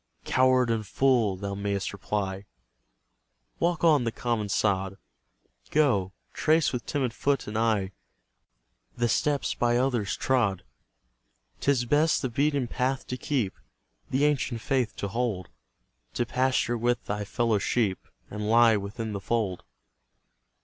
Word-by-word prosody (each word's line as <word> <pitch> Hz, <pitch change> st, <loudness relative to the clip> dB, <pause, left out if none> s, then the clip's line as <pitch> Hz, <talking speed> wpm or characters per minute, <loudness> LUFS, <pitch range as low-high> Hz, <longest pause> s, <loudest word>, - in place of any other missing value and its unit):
"Coward 130 Hz, -2 st, +3 dB
and 110 Hz, -2 st, -2 dB
fool!" 120 Hz, -6 st, +2 dB
thou 100 Hz, +1 st, -4 dB
mayst 100 Hz, -1 st, -2 dB
reply, 100 Hz, -1 st, -3 dB, 1.1 s
Walk 170 Hz, -1 st, 0 dB
on 155 Hz, -6 st, +5 dB
the 115 Hz, -, -1 dB
common 115 Hz, -3 st, -2 dB
sod; 95 Hz, -1 st, 0 dB, 0.7 s
Go, 120 Hz, -12 st, +2 dB, 0.2 s
trace 155 Hz, -2 st, +2 dB
with 125 Hz, -, -4 dB
timid 130 Hz, -5 st, -1 dB
foot 140 Hz, +1 st, 0 dB
and 105 Hz, -, -6 dB
eye 110 Hz, -4 st, +1 dB, 1.1 s
The 120 Hz, 0 st, +2 dB
steps 145 Hz, +4 st, 0 dB
by 120 Hz, 0 st, +1 dB
others 120 Hz, -5 st, 0 dB
trod. 110 Hz, -8 st, +1 dB, 1.0 s
'Tis 135 Hz, -4 st, +1 dB
best 150 Hz, +5 st, +2 dB
the 130 Hz, -, 0 dB
beaten 140 Hz, +1 st, +1 dB
path 130 Hz, +2 st, -1 dB
to 125 Hz, -, -2 dB
keep, 125 Hz, -6 st, -1 dB, 0.6 s
The 135 Hz, +3 st, +2 dB
ancient 135 Hz, -5 st, 0 dB
faith 130 Hz, -4 st, 0 dB
to 100 Hz, -, -3 dB
hold; 110 Hz, -4 st, -2 dB, 0.7 s
To 120 Hz, -, 0 dB
pasture 125 Hz, -2 st, 0 dB
with 120 Hz, +1 st, 0 dB
thy 105 Hz, 0 st, -3 dB
fellow 110 Hz, 0 st, 0 dB
sheep, 100 Hz, -2 st, 0 dB, 0.3 s
And 105 Hz, 0 st, -4 dB
lie 115 Hz, -1 st, +6 dB
within 105 Hz, +3 st, -5 dB
the 100 Hz, -, -4 dB
fold. 100 Hz, -3 st, -1 dB
120 Hz, 135 wpm, -27 LUFS, 100-130 Hz, 1.1 s, lie